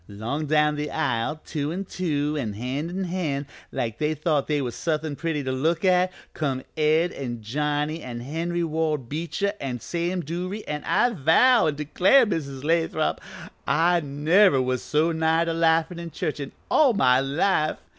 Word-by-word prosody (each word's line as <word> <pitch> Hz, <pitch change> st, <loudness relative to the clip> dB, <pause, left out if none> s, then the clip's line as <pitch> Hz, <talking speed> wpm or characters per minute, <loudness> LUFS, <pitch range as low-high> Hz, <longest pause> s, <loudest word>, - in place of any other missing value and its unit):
"'Long 120 Hz, +10 st, -4 dB
down 150 Hz, 0 st, +2 dB
the 150 Hz, 0 st, -3 dB
aisle, 150 Hz, 0 st, -1 dB
two 150 Hz, -1 st, -3 dB
an' 190 Hz, +4 st, -4 dB
two, 150 Hz, -5 st, -1 dB
an' 120 Hz, -8 st, -2 dB
hand 130 Hz, +9 st, -3 dB
in 190 Hz, +2 st, -3 dB
hand, 165 Hz, -6 st, -2 dB, 0.3 s
like 115 Hz, -2 st, -3 dB
they 155 Hz, +1 st, 0 dB
thought 150 Hz, -2 st, 0 dB
they 150 Hz, -1 st, +1 dB
was 125 Hz, -4 st, -3 dB
suthin' 155 Hz, -2 st, -2 dB
pretty 160 Hz, -2 st, -2 dB
to 130 Hz, -, -2 dB
look 160 Hz, +7 st, 0 dB
at, 185 Hz, 0 st, +3 dB, 0.2 s
come 135 Hz, -4 st, -2 dB
Ed 155 Hz, +3 st, +2 dB
an' 120 Hz, -4 st, -6 dB
Johnny 150 Hz, +6 st, -1 dB
an' 120 Hz, -3 st, -6 dB
Henry 165 Hz, +6 st, -2 dB
Ward 155 Hz, -5 st, -1 dB
Beecher 170 Hz, +6 st, -2 dB
an' 125 Hz, -3 st, -3 dB
Sam 175 Hz, +7 st, -2 dB
Duruy, 180 Hz, +6 st, -4 dB
an' 150 Hz, 0 st, -4 dB
I 245 Hz, -, +3 dB
vow 220 Hz, -, +4 dB
an' 150 Hz, -, 0 dB
declare, 185 Hz, -, +4 dB
Mrs. 140 Hz, -9 st, -4 dB
Lathrop, 160 Hz, 0 st, 0 dB, 0.5 s
I 170 Hz, +3 st, +3 dB
never 150 Hz, +3 st, +3 dB
was 130 Hz, -1 st, 0 dB
so 155 Hz, +3 st, +1 dB
nigh 160 Hz, +1 st, +2 dB
to 165 Hz, -, -1 dB
laughin' 165 Hz, +1 st, +2 dB
in 170 Hz, 0 st, -6 dB
church 155 Hz, -2 st, -3 dB
in 140 Hz, -, -5 dB, 0.2 s
all 280 Hz, -6 st, +5 dB
my 130 Hz, -, +4 dB
life. 155 Hz, +4 st, +1 dB
155 Hz, 175 wpm, -25 LUFS, 140-170 Hz, 0.5 s, all